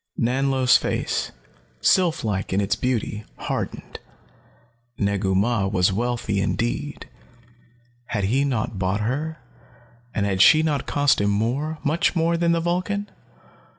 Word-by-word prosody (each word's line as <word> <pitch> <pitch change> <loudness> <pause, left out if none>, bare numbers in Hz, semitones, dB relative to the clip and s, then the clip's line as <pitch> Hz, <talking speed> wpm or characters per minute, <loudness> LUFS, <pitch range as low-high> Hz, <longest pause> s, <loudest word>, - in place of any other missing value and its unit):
Nanlo's 130 +1 +3
face, - - -2 0.5
sylph 175 - +2
like 100 -4 -2
in 95 - +1
its 100 +1 +1
beauty, 110 -3 -2
hardened. - - -5 1.0
Negu 100 -2 0
Mah 100 0 +1
was 95 -1 +2
wealthy 115 -2 -1
indeed. 120 +8 -2 1.0
Had 105 -3 -2
he 125 +8 +2
not 110 -7 -2
bought 95 +2 0
her, 150 +8 -2 0.8
and 100 - +1
had 95 -2 +1
she 155 +6 +7
not 150 -3 -1
cost 145 -6 +2
him 100 - +2
more, 125 +10 -1
much 155 +5 +1
more, 170 0 +2
than 170 0 +1
the 170 - +2
Vulcan? 185 +4 -2
120 Hz, 130 wpm, -23 LUFS, 100-155 Hz, 1.0 s, she